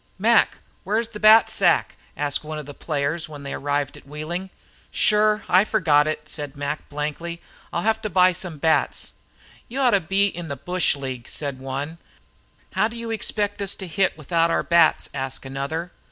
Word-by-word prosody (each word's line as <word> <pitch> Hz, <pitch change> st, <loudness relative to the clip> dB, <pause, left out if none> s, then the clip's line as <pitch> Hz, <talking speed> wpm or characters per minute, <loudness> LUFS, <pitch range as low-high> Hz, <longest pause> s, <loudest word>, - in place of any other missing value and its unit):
"Mac, 225 Hz, +4 st, +4 dB, 0.3 s
where's 220 Hz, +3 st, 0 dB
the 210 Hz, -2 st, -8 dB
bat 215 Hz, +1 st, +7 dB
sack?" -, -, +2 dB, 0.2 s
asked 145 Hz, 0 st, -1 dB
one 155 Hz, 0 st, -5 dB
of 150 Hz, -, -6 dB
the 145 Hz, -, -9 dB
players, 155 Hz, +2 st, -2 dB
when 145 Hz, -2 st, -9 dB
they 140 Hz, -, -5 dB
arrived 145 Hz, 0 st, -1 dB
at -, -, -15 dB
Wheeling. 160 Hz, +6 st, -5 dB, 0.4 s
"Shure, 215 Hz, 0 st, +3 dB
I 185 Hz, +2 st, +5 dB
forgot 160 Hz, -9 st, +3 dB
it," 155 Hz, 0 st, -3 dB
said 145 Hz, -2 st, -5 dB
Mac, 145 Hz, +1 st, -4 dB
blankly. 150 Hz, +4 st, -4 dB, 0.3 s
"I'll 170 Hz, -, -2 dB
have 220 Hz, 0 st, +1 dB
to 215 Hz, -, -3 dB
buy 185 Hz, -1 st, +5 dB
some 175 Hz, -3 st, -5 dB
bats." 160 Hz, +2 st, +1 dB, 0.5 s
"You 255 Hz, +4 st, -5 dB
ought 255 Hz, -3 st, +4 dB
to 200 Hz, -, +4 dB
be 195 Hz, +4 st, +2 dB
in 175 Hz, -4 st, -4 dB
a 140 Hz, -, -3 dB
bush 180 Hz, +1 st, 0 dB
league," 130 Hz, -4 st, -6 dB
said 140 Hz, -3 st, -5 dB
one. 140 Hz, +5 st, -5 dB, 0.7 s
"How 215 Hz, -, +2 dB
do 230 Hz, +1 st, -9 dB
you 230 Hz, 0 st, -5 dB
expect 205 Hz, -2 st, -1 dB
us 200 Hz, -1 st, -1 dB
to 190 Hz, -, -7 dB
hit 185 Hz, +1 st, 0 dB
without 165 Hz, +2 st, +1 dB
our -, -, +1 dB
bats?" 170 Hz, -2 st, +4 dB
asked 135 Hz, -1 st, -4 dB
another. 140 Hz, +6 st, -4 dB
165 Hz, 185 wpm, -23 LUFS, 145-200 Hz, 0.7 s, bat